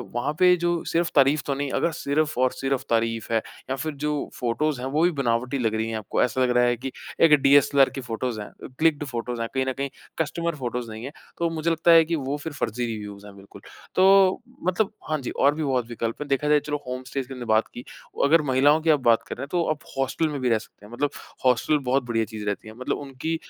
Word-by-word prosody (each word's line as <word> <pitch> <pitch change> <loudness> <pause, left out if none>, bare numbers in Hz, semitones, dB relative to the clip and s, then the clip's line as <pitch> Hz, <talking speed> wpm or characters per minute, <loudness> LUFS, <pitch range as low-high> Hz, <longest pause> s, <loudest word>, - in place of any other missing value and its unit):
वहाँ 120 +5 -1
पे 180 0 +6
जो 175 0 0
सिर्फ़ 170 +1 +1
तारीफ़ 145 +2 +4
तो 140 - 0
नहीं? 140 0 -3
अगर 170 - +1
सिर्फ़ 155 -2 -1
और 130 0 +3
सिर्फ़ 135 -1 -2
तारीफ़ 115 -1 0
है 115 - +3 0.3
या 135 - 0
फिर 155 +3 -4
जो 150 -1 -1
फोटोज़ 125 +4 0
हैं, 130 - -3
वो 150 +4 +1
भी 175 - +4
बनावटी 120 +2 0
लग 115 -3 0
रही 110 +1 -1
हैं 110 - -2
आपको, 110 - -2
ऐसा 125 +1 0
लग 125 - +3
रहा 125 - +5
है 120 0 +2
कि 130 +3 -5 0.3
एक 160 -2 +7
डीएसएलआर 140 0 +5
की 135 - -6
फोटोज़ 120 -1 -3
हैं 105 - -7
अ, - - -12
क्लिक्ड 155 -2 +3
फोटोज़ 120 -2 -4
कहीं 130 +3 -1
ना 130 - 0
कहीं 140 +1 -3 0.3
कस्टमर 170 +1 -2
फोटोज़ 125 -3 -4
नहीं 110 +1 -8
है। 140 - -6 0.3
तो 170 -1 0
मुझे 165 0 -1
लगता 165 +1 +3
है 165 -1 +8
कि 165 +1 -1
वो 140 -1 -2
फ़िर 155 +1 -7
फ़र्ज़ी 120 -3 -2
रिव्युज़ 105 -3 -6
हैं 100 -1 -12
बिल्कुल। 100 0 -14 0.3
तो 190 +2 +5 0.3
मतलब 190 +3 +1 0.2
हाँ 155 - +1
जी, 125 - -4
और 140 +1 +2
भी 155 - -2
बहुत 130 -4 0
विकल्प 115 +2 -4
हैं। 150 - -4
देखा 140 +1 0
जाए 150 0 +5
चलो, 150 0 -3
होम 130 0 -4
स्टेज़ 135 0 -4
की 135 - -8
हमने 125 -2 -7
बात 110 0 +2
की। 120 - -8 0.4
अगर 160 +3 +5
महिलाओं 145 +4 +4
की 160 - 0
आप 150 -2 +5
बात 115 -3 +3
कर - - -5
रहे - - -6
हैं, 140 - -5
तो 175 -1 +1
आप 150 - -3 0.2
हॉस्टल 135 +4 0
में 145 -2 -4
भी 125 - +1
रह 115 - +4
सकते 105 -1 -13
हैं 105 - -14
मतलब 145 +4 0 0.4
हॉस्टल 130 +4 +3
बहुत 135 +1 +2
बढ़िया 115 -1 0
चीज़ 110 -1 -7
रहती 105 +1 -3
है। 110 - -9
मतलब 130 - -2
उनकी 140 +4 -4
135 Hz, 255 wpm, -25 LUFS, 120-155 Hz, 0.4 s, है